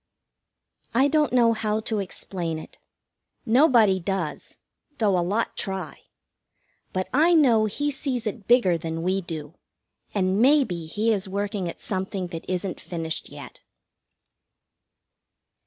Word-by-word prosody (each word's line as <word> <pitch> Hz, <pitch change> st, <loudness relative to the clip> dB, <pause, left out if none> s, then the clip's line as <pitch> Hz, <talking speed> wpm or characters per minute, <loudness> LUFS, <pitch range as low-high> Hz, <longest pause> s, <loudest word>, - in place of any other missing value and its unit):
I 265 Hz, +4 st, +5 dB
don't 300 Hz, -1 st, +2 dB
know 235 Hz, -2 st, +4 dB
how 215 Hz, -1 st, -1 dB
to 220 Hz, -1 st, -2 dB
explain 180 Hz, -3 st, -4 dB
it. 155 Hz, -, -11 dB, 0.7 s
Nobody 230 Hz, -6 st, +5 dB
does, 175 Hz, -4 st, -4 dB, 0.4 s
though 205 Hz, -4 st, +2 dB
a 180 Hz, -, +2 dB
lot 200 Hz, +7 st, -1 dB
try. 190 Hz, -5 st, -3 dB, 0.9 s
But 185 Hz, 0 st, -2 dB
I 325 Hz, +6 st, +5 dB
know 240 Hz, -8 st, +5 dB
He 290 Hz, +8 st, -1 dB
sees 260 Hz, -4 st, -3 dB
it 215 Hz, -1 st, -5 dB
bigger 195 Hz, -9 st, +4 dB
than 165 Hz, 0 st, -4 dB
we 190 Hz, +2 st, +1 dB
do, 160 Hz, -3 st, -7 dB, 0.6 s
and 190 Hz, +1 st, +1 dB
maybe 250 Hz, -, +3 dB
He 215 Hz, +7 st, +1 dB
is 195 Hz, -2 st, -3 dB
working 200 Hz, -2 st, -2 dB
at -, -, -10 dB
something 190 Hz, -2 st, -3 dB
that 165 Hz, -2 st, -7 dB
isn't 185 Hz, 0 st, -3 dB
finished 165 Hz, -2 st, -4 dB
yet. -, -, -11 dB
200 Hz, 130 wpm, -25 LUFS, 180-230 Hz, 0.9 s, I